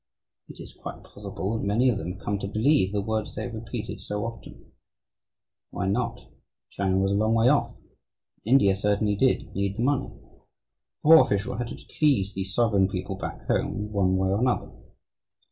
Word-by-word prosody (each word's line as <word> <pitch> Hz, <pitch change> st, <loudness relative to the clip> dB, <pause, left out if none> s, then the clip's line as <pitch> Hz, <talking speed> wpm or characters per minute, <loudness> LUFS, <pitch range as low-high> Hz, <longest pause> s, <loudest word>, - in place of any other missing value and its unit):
It -, -, -11 dB
is -, -, -9 dB
quite -, -, -9 dB
possible 100 Hz, 0 st, -5 dB
that 110 Hz, -, -3 dB
many 110 Hz, +6 st, +2 dB
of 120 Hz, -5 st, +2 dB
them 85 Hz, 0 st, -4 dB
have 95 Hz, -, -14 dB
come 100 Hz, -1 st, -1 dB
to 100 Hz, -, -4 dB
believe 110 Hz, 0 st, +2 dB
the 105 Hz, -1 st, -1 dB
words 110 Hz, 0 st, -3 dB
they -, -, -3 dB
have 120 Hz, -, -6 dB
repeated 110 Hz, 0 st, -6 dB
so 105 Hz, +1 st, -3 dB
often. 115 Hz, -, -10 dB, 1.0 s
Why 95 Hz, -, -3 dB
not? 115 Hz, +3 st, -1 dB, 0.5 s
China 95 Hz, -1 st, 0 dB
was 95 Hz, +1 st, +2 dB
a -, -, +1 dB
long 110 Hz, +3 st, +2 dB
way 115 Hz, +2 st, +4 dB
off 145 Hz, -, +1 dB
and -, -, -29 dB, 0.7 s
India 100 Hz, -8 st, +5 dB
certainly 105 Hz, +1 st, +1 dB
did 110 Hz, -2 st, +1 dB
need 100 Hz, +1 st, -2 dB
the 115 Hz, -, 0 dB
money. 135 Hz, 0 st, +1 dB
The -, -, -19 dB, 0.7 s
poor 160 Hz, +1 st, +9 dB
official 100 Hz, 0 st, -1 dB
had 120 Hz, 0 st, -3 dB
to 125 Hz, -, -7 dB, 0.2 s
please 120 Hz, -11 st, +3 dB
the 95 Hz, -, -2 dB
sovereign 100 Hz, 0 st, +2 dB
people 95 Hz, 0 st, -4 dB
back 95 Hz, -, -7 dB
home, 105 Hz, +2 st, -1 dB
one 95 Hz, -2 st, +2 dB
way 95 Hz, 0 st, +1 dB
or 100 Hz, +2 st, +1 dB
another. 125 Hz, -1 st, 0 dB
105 Hz, 190 wpm, -26 LUFS, 95-115 Hz, 1.0 s, poor